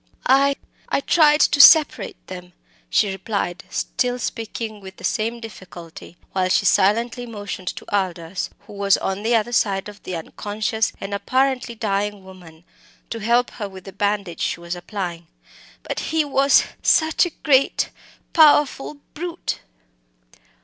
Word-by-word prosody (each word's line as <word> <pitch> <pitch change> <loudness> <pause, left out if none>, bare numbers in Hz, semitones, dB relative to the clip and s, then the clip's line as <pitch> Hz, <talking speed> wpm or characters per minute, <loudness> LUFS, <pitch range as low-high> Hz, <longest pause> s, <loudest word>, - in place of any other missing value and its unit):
"I 275 +2 +4 0.3
I - - +1
tried 300 0 +4
to 285 - +5
separate 315 -1 +6
them," 180 -1 -10 0.4
she 205 -2 +2
replied, 190 -2 -3
still 250 0 -1
speaking 225 -2 -5
with 190 -1 -11
the - - -14
same 230 +1 -1
difficulty, 180 -5 -11
while 185 -1 0
she 200 - +2
silently 230 +6 +2
motioned 205 -4 -7
to - - -10
Aldous, 180 -2 -2
who - - -14
was 200 -1 +2
on 195 +1 -3
the 230 +2 +2
other 225 +1 0
side 195 -4 +1
of 205 0 -11
the 185 - -5
unconscious 210 +6 -2
and 195 +1 -6
apparently 255 +2 0
dying 205 -2 -2
woman, 175 -4 -14 0.5
to 230 - -3
help 235 +3 +2
her 205 -3 -6
with 190 -1 -12
the 195 - -11
bandage 200 -3 -2
she - - -1
was 170 +1 -5
applying. 175 -2 -6 0.6
"But - - -4
he 320 -1 0
was 275 0 +4 0.2
such 320 +2 +3
a 340 - -11
great 275 -3 +3 0.4
powerful 295 -3 +4 0.2
brute." 345 +2 -4
210 Hz, 145 wpm, -21 LUFS, 190-245 Hz, 0.6 s, separate